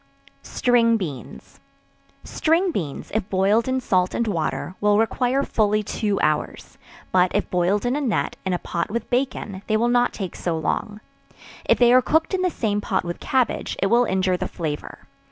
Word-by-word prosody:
String 230 -2 +2
Beans. 150 - -8 0.6
String 340 +4 +1
beans, 155 - -5
if 215 -2 -1
boiled 200 +5 +2
in 260 0 0
salt 185 -7 0
and 235 - 0
water, 175 -3 -2
will 205 0 +3
require 250 +4 +1
fully 215 -3 +1
two 205 0 -1
hours; 155 -1 -2 0.3
but 180 0 +4
if 205 - 0
boiled 185 +5 +1
in 245 +2 +1
a 295 - -1
net, 245 -8 -1
in 190 - -2
a 180 - +1
pot 170 -1 -3
with 235 +4 -4
bacon, 245 -6 -2
they 215 - +2
will 235 +2 +1
not 245 0 +3
take 190 -5 -6
so 170 -2 -2
long; 210 +6 -3 0.6
if - - +3
they 240 0 +5
are 255 - +7
cooked 320 +7 +1
in 375 - +1
the 365 - +2
same 210 -9 -1
pot 195 -2 -1
with 175 -1 -5
cabbage, 260 -2 -1
it 195 - 0
will 240 +1 +5
injure 185 -2 +1
the - - -3
flavor. 155 -3 -6
210 Hz, 185 wpm, -23 LUFS, 185-245 Hz, 0.6 s, are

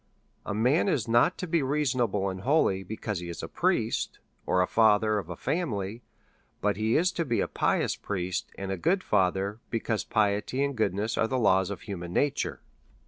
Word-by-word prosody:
A - - -1
man 130 - +3
is 130 - 0
not 120 +10 +3
to - - -3
be 170 -2 +1
reasonable 130 -8 0
and 95 -1 -4
holy, 125 -7 +2
because 105 0 -4
he 85 0 -6
is 85 - -6
a - - -3
priest, - - 0 0.3
or 90 - +2
the 90 - +4
father 110 0 +3
of 90 -4 -8
a 90 - -4
family; 115 - -2 0.6
but 105 -1 +1
he 110 +3 +1
is 180 +3 +3
to 170 - -1
be 120 -7 0
a - - +1
pious - - 0
priest, 95 -2 -3
and 95 0 -4
a 95 - -2
good 185 - +1
father, 95 +2 +1
be 115 - -1
cause 110 -1 -1
piety 105 +5 +1
and 140 -1 -1
goodness 110 0 0
are 115 - +3
the 130 - -1
laws 95 -5 +3
of 100 - -5
human 90 -4 -6
na 145 - +3
ture. - - -4
110 Hz, 200 wpm, -28 LUFS, 95-130 Hz, 0.6 s, the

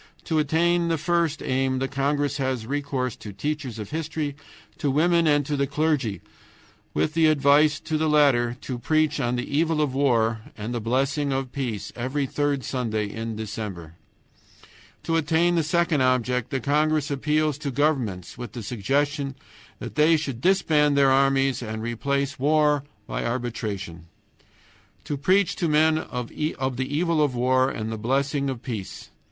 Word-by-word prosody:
To 160 -2 0
attain 170 +3 +2
the 165 -1 +1
first 170 -1 0
aim 130 0 0
the 135 +1 -1
congress 145 +1 0
has 130 -4 -2
recourse 135 -2 -2
to 105 - -9
teachers 135 +2 -4
of 105 -2 -7
history, 155 -2 -3 0.4
to 145 - 0
women, 165 +4 +3
and 145 -2 +3
to 145 - -1
the 140 0 0
clergy, 140 - 0 0.7
with 155 - +1
the 165 -1 +4
advice 145 0 +4
to 155 -1 -2
the 155 0 +1
latter 130 -5 +3
to 125 -2 -5
preach 155 +2 +1
on 120 -2 0
the 125 - -2
evil 160 +2 +1
of 145 -4 +1
war 115 -5 +2 0.2
and 110 +3 -4
the 120 - -2
blessing 135 +5 0
of 135 -1 -2
peace 125 -7 -4
every 130 +4 -1
third 145 0 -1
Sunday 110 -4 -2
in 115 0 -5
December. 105 -6 -6 1.1
To 165 - +1
attain 165 +2 +2
the 170 - +3
second 165 -1 +1
object 125 -1 +1
the 135 -3 -1
congress 150 +2 +1
appeals 150 +1 0
to 150 -2 -3
governments 125 - -1
with 120 -4 -7
the 120 - -6
suggestion 140 +6 -1 0.4
that - - -7
they 155 +2 +4
should 135 -6 -4
disband 155 -6 +3
their 135 -1 +5
armies 135 -1 +3
and 110 -2 -5
replace 140 +4 -2
war 150 0 +3 0.2
by - - -3
arbitration. 105 -8 -4 1.0
To 145 - -3
preach 185 +7 +2
to 175 - 0
men 155 +1 +4
of 125 -6 -5
the 130 -2 -2
evil 165 -2 +2
of 145 -4 +1
war 130 +2 +3
and 110 -4 -4
the 110 - -4
blessing 140 +4 0
of 130 -3 -5
peace! 110 -7 -6
140 Hz, 165 wpm, -25 LUFS, 125-150 Hz, 1.1 s, their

